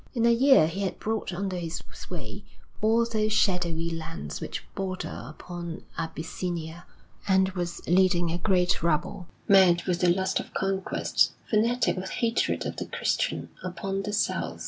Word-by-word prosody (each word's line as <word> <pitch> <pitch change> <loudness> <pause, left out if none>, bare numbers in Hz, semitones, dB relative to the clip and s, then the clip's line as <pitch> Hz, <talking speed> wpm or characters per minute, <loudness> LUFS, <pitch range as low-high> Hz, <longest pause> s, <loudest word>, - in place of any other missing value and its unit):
In 235 -1 +2
a 235 - +6
year 265 - +6
he 170 +5 -3
had 195 - -2
brought 220 -2 -2
under 185 +1 -3
his 170 -1 -4
sway - - -7 0.4
all 225 +2 +4
those 215 -2 0
shadowy 170 -5 +1
lands 165 - -5
which - - -5
border 190 -1 -4
upon 170 +1 -7
Abyssinia, 165 +1 -4 0.4
and 190 -1 +4
was 175 -2 -4
leading 175 -1 +3
a 170 - -2
great 180 -1 +2
rabble, 170 +2 -1 0.2
mad 185 -3 +6
with 180 -2 0
the 180 - +4
lust 190 +2 +1
of - - -9
conquest, 195 0 +1
fanatic 230 +1 +2
with 185 +1 -4
hatred 235 0 0
of - - -4
the - - -4
Christian, - - -1
upon 195 +2 -3
the 205 - -4
South. 205 - -1
185 Hz, 155 wpm, -27 LUFS, 170-200 Hz, 0.4 s, a